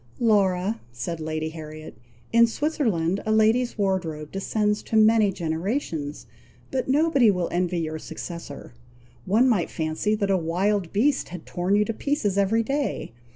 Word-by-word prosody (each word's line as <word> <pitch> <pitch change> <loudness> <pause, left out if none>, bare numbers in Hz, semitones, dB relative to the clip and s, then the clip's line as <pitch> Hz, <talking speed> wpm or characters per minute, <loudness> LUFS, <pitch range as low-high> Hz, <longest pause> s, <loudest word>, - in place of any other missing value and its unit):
"Laura," 205 -2 +2
said 160 +8 -5
Lady 155 0 -3
Harriet, 155 -3 -9 0.4
"in 235 0 +6
Switzerland 225 - 0
a 215 - -1
lady's 220 +3 +3
wardrobe 175 -7 -2
descends 210 +2 0
to - - -5
many 220 -1 +5
generations; 165 - -3 0.5
but 260 - -1
nobody 280 -4 +4
will 180 -4 +1
envy 175 -1 0
your 155 -1 -4
successor! 170 -6 -8 0.5
One 220 +7 +4
might 210 -9 +2
fancy 160 +7 -1
that 200 -2 0
a 190 - +3
wild 180 +2 0
beast 265 +7 +1
had 175 -2 -8
torn 180 +3 0
you 210 0 +3
to 225 - -2
pieces 250 -6 -1
every 200 +3 +2
day! 275 - -2
195 Hz, 150 wpm, -25 LUFS, 165-225 Hz, 0.5 s, in